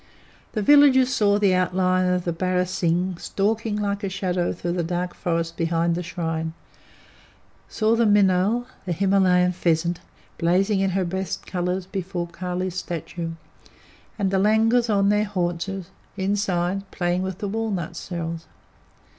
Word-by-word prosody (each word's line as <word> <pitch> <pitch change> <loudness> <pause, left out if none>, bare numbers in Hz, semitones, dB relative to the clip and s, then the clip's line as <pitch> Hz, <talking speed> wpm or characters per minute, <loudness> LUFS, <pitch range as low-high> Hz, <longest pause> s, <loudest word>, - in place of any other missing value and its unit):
The 215 - -1
villagers 270 0 +6
saw 205 -4 +3
the 200 -2 +3
outline 185 0 +2
of 180 -1 0
the 170 - 0
barasingh 180 0 0
stalking 215 +1 -1
like 205 0 -2
a 195 - -1
shadow 180 -2 -1
through 175 0 -3
the 175 0 -1
dark 175 +1 -2
forest 165 -1 -2
behind 165 0 +1
the 175 - -2
shrine; 165 -2 -3 1.2
saw 220 +1 +2
the 230 0 +3
minaul, 205 +3 +3 0.2
the 175 - 0
Himalayan 185 -1 +3
pheasant, 170 -1 0 0.4
blazing 190 +4 +2
in 195 0 +2
her 190 - +1
best 190 0 -4
colours 180 0 -2
before 185 -2 -4
Kali's 180 +1 -4
statue; 170 -1 -5 0.8
and 195 -3 0
the 190 - +2
langurs 225 +4 +3
on 200 -1 +3
their 210 +1 +2
haunches, 185 -1 -3 0.3
inside, 195 -1 -1
playing 175 0 -1
with 190 -1 -3
the 205 - -4
walnut 200 -6 -3
shells. 165 -1 -5
185 Hz, 140 wpm, -24 LUFS, 175-200 Hz, 1.2 s, villagers